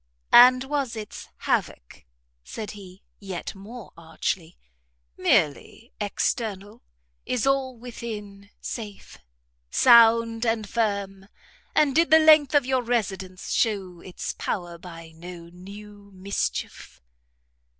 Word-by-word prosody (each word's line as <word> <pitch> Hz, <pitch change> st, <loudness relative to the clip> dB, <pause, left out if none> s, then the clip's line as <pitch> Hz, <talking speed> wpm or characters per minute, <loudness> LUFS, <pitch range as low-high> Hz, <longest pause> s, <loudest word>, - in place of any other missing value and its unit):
"And 255 Hz, +1 st, +8 dB
was 275 Hz, -3 st, -2 dB
its 215 Hz, -2 st, -8 dB, 0.2 s
havoc," -, -, -2 dB, 0.4 s
said 215 Hz, -, -7 dB
he, 190 Hz, -2 st, -13 dB, 0.2 s
yet 190 Hz, -4 st, -6 dB
more 210 Hz, +3 st, -11 dB
archly, 165 Hz, +1 st, -4 dB, 0.6 s
"merely 150 Hz, -, 0 dB
external? 205 Hz, 0 st, -2 dB, 0.5 s
is 250 Hz, -1 st, -1 dB
all 270 Hz, -2 st, 0 dB
within 210 Hz, -4 st, -8 dB
safe? 210 Hz, -4 st, -8 dB, 0.5 s
sound 230 Hz, -, +5 dB
and 225 Hz, -2 st, 0 dB
firm? 200 Hz, -4 st, -2 dB, 0.5 s
and 290 Hz, -3 st, +3 dB
did 330 Hz, +1 st, +4 dB
the 320 Hz, -, +8 dB
length 310 Hz, -3 st, +6 dB
of 285 Hz, -3 st, +4 dB
your 260 Hz, 0 st, +1 dB
residence 195 Hz, -6 st, -3 dB
shew 190 Hz, -6 st, -1 dB
its 185 Hz, -, -6 dB
power 175 Hz, -3 st, -4 dB
by 165 Hz, -2 st, -11 dB
no 170 Hz, 0 st, -10 dB
new 200 Hz, +3 st, -13 dB
mischief?" 195 Hz, +2 st, -4 dB
210 Hz, 110 wpm, -25 LUFS, 185-240 Hz, 0.6 s, And